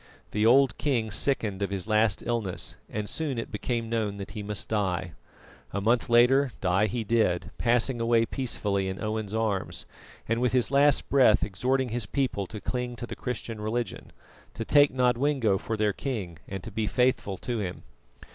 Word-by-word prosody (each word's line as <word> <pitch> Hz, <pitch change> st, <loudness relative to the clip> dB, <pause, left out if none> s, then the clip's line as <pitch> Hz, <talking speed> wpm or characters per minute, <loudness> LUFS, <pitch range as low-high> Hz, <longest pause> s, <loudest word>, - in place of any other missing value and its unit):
The 105 Hz, +1 st, +2 dB
old 135 Hz, +3 st, +4 dB
king 120 Hz, -7 st, 0 dB
sickened 105 Hz, -4 st, +1 dB
of 100 Hz, -, 0 dB
his 100 Hz, 0 st, -3 dB
last 110 Hz, -2 st, +2 dB
illness, 115 Hz, -6 st, -2 dB
and 105 Hz, 0 st, -4 dB
soon 150 Hz, -2 st, -2 dB
it 115 Hz, -, -4 dB
became 115 Hz, +2 st, -2 dB
known 110 Hz, -3 st, -1 dB
that 100 Hz, -, -7 dB
he 105 Hz, +1 st, -6 dB
must 105 Hz, -1 st, -3 dB
die. 95 Hz, -5 st, -1 dB, 0.6 s
A 100 Hz, -, 0 dB
month 115 Hz, +5 st, +1 dB
later 125 Hz, +2 st, +5 dB
die 95 Hz, +3 st, +2 dB
he 115 Hz, +3 st, -2 dB
did, 110 Hz, -5 st, +1 dB
passing 120 Hz, +1 st, +1 dB
away 115 Hz, 0 st, +3 dB
peacefully 105 Hz, -7 st, -1 dB
in 95 Hz, 0 st, -4 dB
Owen's 110 Hz, -1 st, -3 dB
arms, 110 Hz, -4 st, -2 dB, 0.4 s
and 115 Hz, +1 st, 0 dB
with 125 Hz, 0 st, +1 dB
his 125 Hz, 0 st, +2 dB
last 140 Hz, 0 st, +4 dB
breath 130 Hz, -6 st, +5 dB
exhorting 125 Hz, +6 st, 0 dB
his 115 Hz, -2 st, -2 dB
people 120 Hz, -6 st, -1 dB
to 105 Hz, -, -7 dB
cling 125 Hz, +2 st, -3 dB
to 120 Hz, -, -6 dB
the -, -, -7 dB
Christian 115 Hz, -3 st, -5 dB
religion; 115 Hz, +3 st, -3 dB, 0.4 s
to 115 Hz, -, -4 dB
take 145 Hz, +2 st, +5 dB
Nodwengo 125 Hz, -4 st, +2 dB
for 110 Hz, +1 st, -3 dB
their 105 Hz, -1 st, +1 dB
king 95 Hz, -, -4 dB
and 95 Hz, -2 st, -6 dB
to 115 Hz, -, -8 dB
be 110 Hz, +1 st, -2 dB
faithful 125 Hz, -6 st, +1 dB
to 120 Hz, +3 st, -3 dB
him. 95 Hz, -3 st, -5 dB
115 Hz, 180 wpm, -27 LUFS, 100-125 Hz, 0.6 s, later